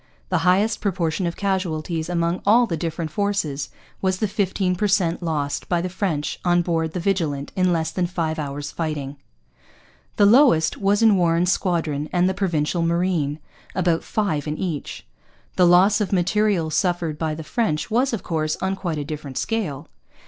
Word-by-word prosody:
The -, -, +1 dB
highest 200 Hz, +5 st, +2 dB
proportion 175 Hz, -2 st, -1 dB
of 170 Hz, -, -3 dB
casualties 170 Hz, -4 st, -2 dB
among 170 Hz, 0 st, 0 dB
all 230 Hz, +4 st, +5 dB
the 175 Hz, -, -2 dB
different 165 Hz, -1 st, -4 dB
forces 160 Hz, -, -1 dB, 0.3 s
was 190 Hz, -1 st, +1 dB
the 215 Hz, -, 0 dB
fifteen 190 Hz, -2 st, 0 dB
per 210 Hz, +4 st, 0 dB
cent 185 Hz, -4 st, +1 dB
lost 150 Hz, -4 st, -2 dB
by 175 Hz, -, +2 dB
the 180 Hz, +2 st, -2 dB
French 175 Hz, -7 st, -2 dB
on 175 Hz, -1 st, +3 dB
board 165 Hz, -2 st, -1 dB
the 180 Hz, -, -2 dB
Vigilant 165 Hz, -7 st, -1 dB
in 185 Hz, -1 st, +2 dB
less 160 Hz, -1 st, 0 dB
than 180 Hz, 0 st, -1 dB
five 165 Hz, -3 st, -2 dB
hours' 145 Hz, 0 st, -4 dB
fighting. 145 Hz, -4 st, -4 dB, 1.0 s
The 205 Hz, -, +4 dB
lowest 205 Hz, -, +5 dB
was 205 Hz, +2 st, +2 dB
in 215 Hz, -3 st, +6 dB
Warren's 175 Hz, 0 st, +2 dB
squadron 160 Hz, -6 st, -1 dB
and 180 Hz, 0 st, +2 dB
the 190 Hz, -, +1 dB
Provincial 170 Hz, -3 st, 0 dB
Marine 165 Hz, -3 st, 0 dB, 0.4 s
about 175 Hz, -3 st, +1 dB
five 160 Hz, -9 st, -1 dB
in 150 Hz, +1 st, -3 dB
each. 165 Hz, -, -4 dB, 0.5 s
The 180 Hz, -, +5 dB
loss 190 Hz, +5 st, +5 dB
of 205 Hz, -, -1 dB
material 190 Hz, -2 st, +1 dB
suffered 170 Hz, -3 st, 0 dB
by 155 Hz, -1 st, -1 dB
the 160 Hz, -, -7 dB
French 160 Hz, -2 st, -1 dB
was, 250 Hz, +4 st, +2 dB
of 230 Hz, -, -3 dB
course, 155 Hz, -2 st, -1 dB
on 190 Hz, 0 st, -1 dB
quite 175 Hz, -5 st, -3 dB
a 145 Hz, -, -3 dB
different 145 Hz, -3 st, -6 dB
scale. 205 Hz, -, -2 dB
175 Hz, 175 wpm, -22 LUFS, 155-195 Hz, 1.0 s, in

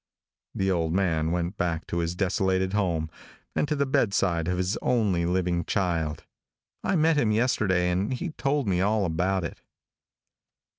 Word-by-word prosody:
The 95 Hz, 0 st, +1 dB
old 85 Hz, -3 st, 0 dB
man 80 Hz, -4 st, +1 dB
went 90 Hz, +3 st, -2 dB
back 85 Hz, -1 st, -1 dB
to 85 Hz, -, -2 dB
his 85 Hz, +1 st, -1 dB
desolated 95 Hz, 0 st, 0 dB
home 85 Hz, -6 st, 0 dB, 0.4 s
and -, -, +1 dB
to 150 Hz, -, 0 dB
the 140 Hz, -1 st, +1 dB
bedside 100 Hz, -, +1 dB
of 90 Hz, 0 st, 0 dB
his 90 Hz, +3 st, 0 dB
only 100 Hz, -8 st, +1 dB
living 90 Hz, -1 st, 0 dB
child. 85 Hz, -5 st, -1 dB, 0.6 s
I -, -, +1 dB
met 160 Hz, -1 st, +3 dB
him 115 Hz, -7 st, +2 dB
yesterday 100 Hz, -6 st, +2 dB
and 95 Hz, +6 st, 0 dB
he 145 Hz, +7 st, -3 dB
told 140 Hz, -4 st, -1 dB
me 90 Hz, -2 st, +1 dB
all 105 Hz, +1 st, +2 dB
about 90 Hz, +3 st, 0 dB
it. 85 Hz, -, -6 dB
95 Hz, 160 wpm, -26 LUFS, 85-105 Hz, 0.6 s, met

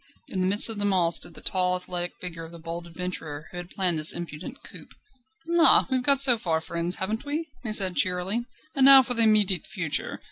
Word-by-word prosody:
In 185 Hz, -, -4 dB
the 185 Hz, -, -1 dB
midst 205 Hz, +3 st, +4 dB
of 225 Hz, -2 st, -5 dB
them 205 Hz, 0 st, 0 dB
all 175 Hz, -3 st, 0 dB
stood 170 Hz, -, -2 dB
the -, -, -9 dB
tall, 180 Hz, -1 st, -1 dB
athletic 180 Hz, -1 st, -5 dB
figure 165 Hz, -2 st, -9 dB
of 165 Hz, -, -12 dB
the 170 Hz, -, -12 dB
bold 170 Hz, +1 st, -9 dB
adventurer 165 Hz, -3 st, -8 dB
who -, -, -10 dB
had 175 Hz, 0 st, -8 dB
planned 180 Hz, -5 st, -2 dB
this 155 Hz, -, +8 dB
impudent 170 Hz, -1 st, -9 dB
coup. -, -, -12 dB, 0.6 s
"La! 335 Hz, -1 st, +5 dB
we've 260 Hz, -1 st, -1 dB
got 275 Hz, +1 st, +6 dB
so 255 Hz, -4 st, +4 dB
far, 165 Hz, -5 st, -2 dB
friends, 170 Hz, +2 st, -1 dB
haven't 215 Hz, +4 st, -5 dB
we?" 300 Hz, +2 st, -6 dB
he 225 Hz, -, -2 dB
said 190 Hz, -4 st, +2 dB
cheerily, 185 Hz, +6 st, -2 dB, 0.3 s
"and 270 Hz, -3 st, +2 dB
now 270 Hz, -1 st, +8 dB
for 245 Hz, -, -3 dB
the 230 Hz, -, +3 dB
immediate 210 Hz, -5 st, +2 dB
future. -, -, -5 dB
185 Hz, 220 wpm, -24 LUFS, 170-225 Hz, 0.6 s, this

